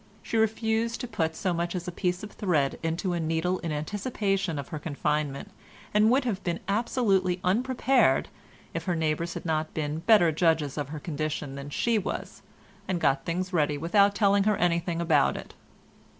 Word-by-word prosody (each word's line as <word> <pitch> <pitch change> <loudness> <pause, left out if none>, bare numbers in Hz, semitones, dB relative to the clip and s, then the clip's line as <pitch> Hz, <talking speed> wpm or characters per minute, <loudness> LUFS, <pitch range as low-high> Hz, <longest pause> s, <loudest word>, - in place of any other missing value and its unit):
She - - -4
refused 225 +1 +1
to 245 - -4
put 160 -8 -1
so 185 +2 -1
much 170 +1 -2
as 175 -1 -4
a - - -2
piece 180 +1 -2
of 210 - -7
thread 155 -9 0
into 170 +3 -1
a 170 - -1
needle 165 +3 0
in 170 - -4
anticipation 195 - -1
of 140 - -5
her 155 - -5
confinement 150 +2 -2 0.4
and 210 +1 +5
would 255 +2 +3
have 210 -6 -2
been 170 -1 -2
absolutely 200 -4 +1
unprepared, 245 - +2 0.5
if 165 -1 -4
her 180 - 0
neighbours 160 +1 -1
had - - -6
not 155 -1 -1
been 150 0 -2
better 175 -2 +5
judges 160 -3 +1
of 145 -2 -3
her 155 0 -5
condition 150 -2 -3
than 140 +1 -7
she 225 +9 +1
was, 195 - -5 0.5
and 185 -2 -1
got 135 -3 +1
things 185 +3 -2
ready 150 -3 +2
without 200 +6 +3
telling 200 -1 +3
her 210 -1 +3
anything 170 -1 0
about 160 -4 +3
it. - - -9
175 Hz, 180 wpm, -27 LUFS, 155-200 Hz, 0.5 s, and